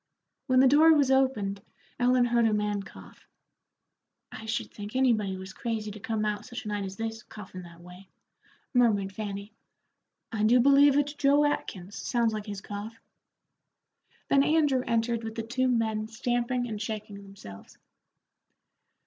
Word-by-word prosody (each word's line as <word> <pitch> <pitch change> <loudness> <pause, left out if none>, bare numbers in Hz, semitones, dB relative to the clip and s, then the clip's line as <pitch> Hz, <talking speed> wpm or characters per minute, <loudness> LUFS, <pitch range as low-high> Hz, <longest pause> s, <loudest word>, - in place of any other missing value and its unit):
When 255 -1 +4
the 265 - +6
door 305 +5 +6
was 280 -3 +3
opened 220 -7 +1 0.4
Ellen 250 0 +3
heard 235 -1 +3
a 220 - +1
man 210 -1 -1
cough. 195 - -14 1.0
"I 220 - -9
should 225 +1 -3
think 205 +3 -9
anybody 220 -7 +1
was 190 +1 -9
crazy 220 -2 -4
to 215 - -10
come 215 +1 -2
out 210 -1 -2
such 240 -2 -8
a - - -4
night 205 -1 -2
as 190 0 -7
this, 225 +1 -5
coughin' 190 -4 -10
that 170 -1 -14
way," 180 +2 -14 0.6
murmured 210 -6 +2
Fanny. 205 0 -6 0.8
"I 220 -3 -3
do 230 +4 +5
believe 280 +2 +6
it's 290 0 +1
Joe 290 0 +3
Atkins; 200 -9 -3
sounds 235 -2 0
like 215 0 -5
his 205 -1 -6
cough." 205 +2 -7 1.3
Then 275 - +4
Andrew 295 -4 +2
entered 230 0 0
with 225 0 -6
the 225 - -3
two 255 +3 0
men 220 -3 0
stamping 245 +2 -1
and 215 -2 -5
shaking 215 -2 -6
themselves. 190 - -13
225 Hz, 155 wpm, -28 LUFS, 205-250 Hz, 1.3 s, the